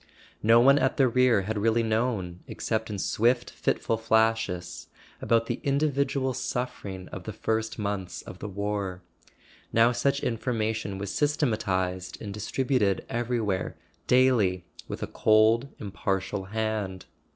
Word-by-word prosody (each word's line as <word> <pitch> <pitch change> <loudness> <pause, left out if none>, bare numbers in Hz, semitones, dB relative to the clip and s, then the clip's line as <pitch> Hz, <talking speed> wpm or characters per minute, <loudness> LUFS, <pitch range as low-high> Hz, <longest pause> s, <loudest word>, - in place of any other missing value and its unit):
No 115 +2 +6
one 140 +4 +6
at 130 0 +1
the 135 - +5
rear 125 -4 +3
had 105 +2 -2
really 115 +2 +2
known, 110 -6 -1
except 110 0 -2
in 105 - -3
swift 120 +5 +1
fitful 115 - 0
flashes, 110 -5 0 0.3
about 115 0 +2
the 120 +1 -2
in¬ 140 0 +1
dividual 140 -2 0
suffering 110 -8 -4
of 90 -1 -8
the - - -4
first 110 +1 -2
months 100 -4 -3
of 90 - -10
the 105 - -5
war; 100 -2 -3 0.7
now 115 +1 +5
such 140 +3 0
information 110 -3 -1
was 100 0 -4
systematized 100 - 0
and 100 -2 -6
distributed 105 -1 0
everywhere, 115 -5 -1 0.3
daily, 115 -9 +3 0.2
with - - -5
a - - +1
cold 110 +4 +3
impartial 95 -1 -2
hand. 105 -2 -3
110 Hz, 135 wpm, -27 LUFS, 100-120 Hz, 0.7 s, No